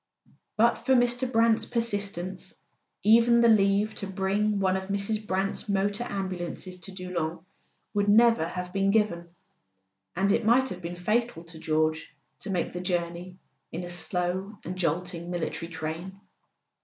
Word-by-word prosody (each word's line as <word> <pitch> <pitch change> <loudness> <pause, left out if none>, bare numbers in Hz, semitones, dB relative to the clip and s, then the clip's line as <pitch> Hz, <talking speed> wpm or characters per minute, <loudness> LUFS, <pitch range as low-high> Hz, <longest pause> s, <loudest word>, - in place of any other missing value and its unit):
But 235 +2 +4
for 265 - +2
Mr. 245 +1 +2
Brant's 225 -1 +3
persistence 200 -6 -2 0.5
even 235 +2 +6
the 235 - +6
leave 205 0 +3
to 200 - -3
bring 195 +2 0
one 190 -1 +2
of 190 0 -4
Mrs. 210 +2 -1
Brant's 195 +2 -1
motor 200 +3 0
ambulances 185 -1 -5
to 180 +2 -9
Doullens 180 -3 -4 0.5
would 205 0 +1
never 225 -5 +5
have 180 +1 -6
been 195 0 +1
given; 195 -5 +1 0.9
and 195 +2 +2
it - - +2
might 250 +4 +4
have 180 -4 -7
been 170 +1 -5
fatal 215 0 -1
to 165 -1 -12
George 155 0 -1 0.2
to 205 - -6
make 180 -3 -1
the 180 - -4
journey 175 0 -3 0.3
in 170 +2 -5
a 175 - -6
slow 180 +4 -1
and 180 - -4
jolting 175 0 -2
military 170 -1 -3
train. 165 +4 -5
190 Hz, 150 wpm, -27 LUFS, 175-210 Hz, 0.9 s, even